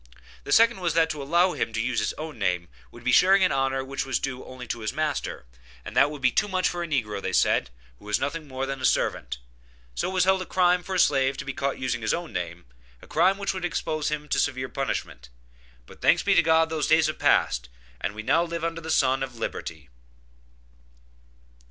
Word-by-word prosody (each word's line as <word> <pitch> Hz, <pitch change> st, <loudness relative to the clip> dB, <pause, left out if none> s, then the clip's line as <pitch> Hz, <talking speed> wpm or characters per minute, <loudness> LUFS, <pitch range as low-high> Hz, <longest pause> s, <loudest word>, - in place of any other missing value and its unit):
The -, -, -5 dB
second 230 Hz, -2 st, +5 dB
was 175 Hz, -3 st, -1 dB
that 165 Hz, -1 st, +3 dB
to 150 Hz, -, -5 dB
allow 170 Hz, +6 st, +3 dB
him 115 Hz, -, -3 dB
to 115 Hz, -, -2 dB
use 120 Hz, 0 st, 0 dB
his -, -, -1 dB
own 155 Hz, -5 st, -8 dB
name 90 Hz, -3 st, -1 dB, 0.2 s
would 120 Hz, -, -14 dB
be 125 Hz, -, +1 dB
sharing 190 Hz, +5 st, +6 dB
an 185 Hz, -, +3 dB
honor 135 Hz, 0 st, 0 dB
which 135 Hz, +1 st, -3 dB
was 135 Hz, -, -1 dB
due 130 Hz, -2 st, -4 dB
only 130 Hz, -1 st, -9 dB
to 115 Hz, -, -4 dB
his 110 Hz, -1 st, -3 dB
master, 155 Hz, -, -3 dB, 0.4 s
and 105 Hz, -, -8 dB
that 135 Hz, +3 st, +5 dB
would 145 Hz, -2 st, -9 dB
be 130 Hz, -, +4 dB
too -, -, +1 dB
much 185 Hz, -2 st, +1 dB
for 175 Hz, -, -3 dB
a 170 Hz, -, -3 dB
negro, 105 Hz, -10 st, -2 dB
said -, -, +3 dB
they, -, -, -25 dB, 0.3 s
who -, -, -17 dB
was 105 Hz, 0 st, 0 dB
nothing 155 Hz, +1 st, -3 dB
more 130 Hz, 0 st, -3 dB
than 135 Hz, -1 st, -5 dB
a -, -, -7 dB
servant. -, -, 0 dB, 0.6 s
So -, -, -2 dB
it -, -, -5 dB
was 185 Hz, -, +3 dB
held 190 Hz, 0 st, +3 dB
as -, -, -4 dB
a -, -, -25 dB
crime 180 Hz, -1 st, +3 dB
for 190 Hz, +1 st, -5 dB
a -, -, +1 dB
slave 135 Hz, -3 st, +3 dB
to -, -, -6 dB
be 135 Hz, -, -4 dB
caught 140 Hz, -2 st, -2 dB
using 125 Hz, -2 st, -2 dB
his 110 Hz, -, +1 dB
own 170 Hz, -1 st, -7 dB
name, 85 Hz, 0 st, -5 dB, 0.3 s
a -, -, -15 dB
crime 185 Hz, +5 st, +2 dB
which 200 Hz, -1 st, -2 dB
would 185 Hz, -2 st, -5 dB
expose 155 Hz, -3 st, -1 dB
him 150 Hz, 0 st, -4 dB
to -, -, +1 dB
severe 130 Hz, -2 st, -1 dB
punishment. 95 Hz, -, -4 dB, 0.6 s
But -, -, -16 dB
thanks -, -, +4 dB
be -, -, +3 dB
to -, -, +6 dB
God 160 Hz, 0 st, +3 dB
that 160 Hz, -, -3 dB
those 155 Hz, -, 0 dB
days 160 Hz, 0 st, +4 dB
have 155 Hz, -, -2 dB
passed, -, -, +2 dB, 0.3 s
and 100 Hz, -, -3 dB
we 110 Hz, -, -6 dB
now 165 Hz, +9 st, +3 dB
live 170 Hz, -1 st, -4 dB
under 165 Hz, 0 st, -2 dB
the 160 Hz, -, -7 dB
sun 135 Hz, -4 st, +2 dB
of 130 Hz, -2 st, -4 dB
liberty. 80 Hz, -, -6 dB
140 Hz, 240 wpm, -26 LUFS, 125-170 Hz, 0.6 s, sharing